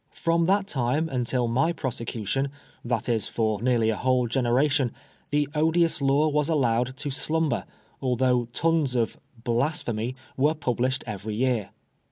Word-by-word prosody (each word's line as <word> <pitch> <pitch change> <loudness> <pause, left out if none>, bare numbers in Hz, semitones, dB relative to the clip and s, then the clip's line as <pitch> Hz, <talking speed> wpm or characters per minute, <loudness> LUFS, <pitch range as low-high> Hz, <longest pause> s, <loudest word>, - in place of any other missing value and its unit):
From 165 0 +1
that 195 +1 +3
time 140 -1 0
until 125 -1 0
my 130 +9 +2
prosecution, 130 - -2 0.3
that 120 -1 -1
is 115 -4 0
for 110 -3 -1
nearly 120 -2 +2
a - - -1
whole 125 +1 +1
generation, 130 +2 +2 0.4
the 145 0 +1
odious 160 +1 +2
law 140 +3 +3
was 150 0 +1
allowed 130 -4 +1
to 145 0 -3
slumber, 155 -1 0 0.4
although 125 -1 +2
tons 145 +2 0
of 115 -2 0
" 115 -2 -23
blasphemy 120 -2 0
" - - -29
were 150 +4 +3
published 130 -2 0
every 105 -1 -5
year. 120 -3 0
130 Hz, 150 wpm, -26 LUFS, 120-150 Hz, 0.4 s, that